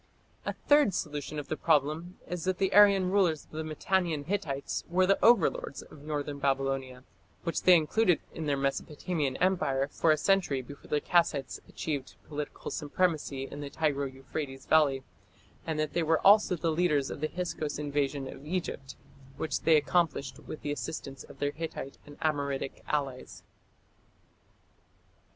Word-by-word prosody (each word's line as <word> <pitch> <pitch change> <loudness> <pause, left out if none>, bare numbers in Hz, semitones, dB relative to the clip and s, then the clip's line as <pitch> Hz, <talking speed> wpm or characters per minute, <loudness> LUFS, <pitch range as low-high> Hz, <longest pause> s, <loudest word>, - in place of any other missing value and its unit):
A - - 0
third 290 - +5
solution 150 -3 -4
of 145 - -5
the - - -2
problem 155 +4 +1
is 180 -1 -4
that 185 -1 0
the 190 -1 0
Aryan 200 -3 +6
rulers 180 -7 +2
of - - -30
the 155 +1 -4
Mitannian 160 0 0
Hittites 155 -7 -2
were 185 +2 +3
the 195 +1 +2
overlords 220 -10 +3
of 145 - -15
northern 145 -1 -4
Babylonia, 135 -2 -1 0.4
which 170 - -1
they 185 - +7
included 175 +3 +3
in 160 -2 -4
their 140 -1 +1
Mesopotamian 140 +1 -2
empire 140 -8 +1
for 160 - +1
a 155 - +5
century 155 -6 +2
before 145 +3 -12
the 150 - +1
Kassites 165 -5 +1
achieved 145 -4 -4
political 150 -1 -5
supremacy 150 -3 -1
in 145 +2 -7
the 145 - -5
Tigro 140 -2 -1
Euphrates 135 0 -6
valley, 145 -4 +3 0.6
and 160 -1 -1
that 155 -1 -1
they 170 - +1
were 160 0 +2
also 200 -2 +6
the 165 0 0
leaders 155 -4 +1
of - - -7
the 155 - +1
Hyksos 170 -4 -3
invasion 145 -1 -1
of 135 - -9
Egypt, 150 -5 -4 0.4
which 160 - -1
they 160 -1 +5
accomplished 150 -3 0
with 155 - -9
the 145 - -2
assistance 135 0 -5
of - - -14
their 145 0 0
Hittite 155 -3 -6
and 145 - -12
Amoritic 140 -3 -1
allies. 140 -4 -3
150 Hz, 160 wpm, -30 LUFS, 140-175 Hz, 0.6 s, they